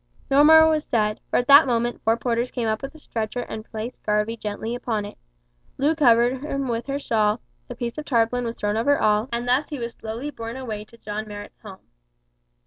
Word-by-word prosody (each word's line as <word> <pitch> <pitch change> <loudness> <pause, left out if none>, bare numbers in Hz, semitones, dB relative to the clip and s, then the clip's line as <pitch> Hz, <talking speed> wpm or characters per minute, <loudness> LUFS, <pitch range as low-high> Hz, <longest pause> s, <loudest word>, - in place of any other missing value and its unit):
No 280 +2 +6
more 320 +1 +8
was 310 -1 +1
said, 215 -2 0
for - - -2
at 245 - +1
that 280 +2 +8
moment 240 0 -1
four 225 +1 +2
porters 240 0 -1
came 240 -3 -3
up 215 0 -1
with 275 +3 -7
a - - -11
stretcher 230 -4 -4
and 220 -2 -6
placed 225 +3 -6
Garvie 210 +2 0
gently 220 +1 -4
upon 225 -4 -2
it. 205 - -9 0.6
Loo 290 +4 +2
covered 250 -3 +3
him 275 -2 -3
with 235 +1 -3
her 275 0 -1
shawl, 215 -6 +1 0.3
a - - -6
piece 240 +4 -4
of 300 - -6
tarpaulin 245 -1 +1
was 230 0 -3
thrown 205 +1 -1
over 285 +6 +3
all, 215 +3 +2
and 235 +1 -2
thus 255 +4 +2
he 295 - -4
was 235 -2 -5
slowly 230 +7 -6
borne 230 -1 -7
away 220 -5 -5
to 230 +2 -18
John 215 -1 -5
Marrot's 205 0 -9
home. 195 -3 -12
235 Hz, 220 wpm, -23 LUFS, 220-265 Hz, 0.6 s, more